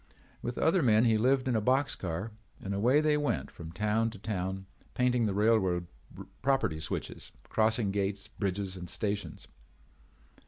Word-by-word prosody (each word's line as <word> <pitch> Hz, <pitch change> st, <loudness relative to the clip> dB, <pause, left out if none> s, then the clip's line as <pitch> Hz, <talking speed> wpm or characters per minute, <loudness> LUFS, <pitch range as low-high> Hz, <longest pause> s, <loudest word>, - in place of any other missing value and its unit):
With 120 Hz, 0 st, -4 dB
other 170 Hz, +3 st, +3 dB
men 115 Hz, -3 st, +4 dB
he 110 Hz, -2 st, +3 dB
lived 130 Hz, +3 st, +2 dB
in 125 Hz, -, +1 dB
a 110 Hz, -, +2 dB
box 130 Hz, +5 st, +2 dB
car 90 Hz, +5 st, -4 dB, 0.3 s
and 100 Hz, -, -2 dB
away 125 Hz, +9 st, +3 dB
they 155 Hz, -1 st, +3 dB
went 105 Hz, -, -1 dB
from 80 Hz, -1 st, -9 dB
town 105 Hz, +5 st, +1 dB
to 110 Hz, -, -10 dB
town 95 Hz, -2 st, -3 dB, 0.3 s
painting 125 Hz, -2 st, +2 dB
the 100 Hz, -, -1 dB
railroad 100 Hz, -5 st, +2 dB, 0.6 s
property 135 Hz, -13 st, +1 dB
switches, 80 Hz, -, -5 dB, 0.2 s
crossing 110 Hz, -1 st, +2 dB
gates, 100 Hz, 0 st, -2 dB
bridges, 95 Hz, -1 st, -3 dB
and 90 Hz, -2 st, -8 dB
stations. 105 Hz, -1 st, -3 dB
105 Hz, 155 wpm, -30 LUFS, 95-125 Hz, 0.6 s, men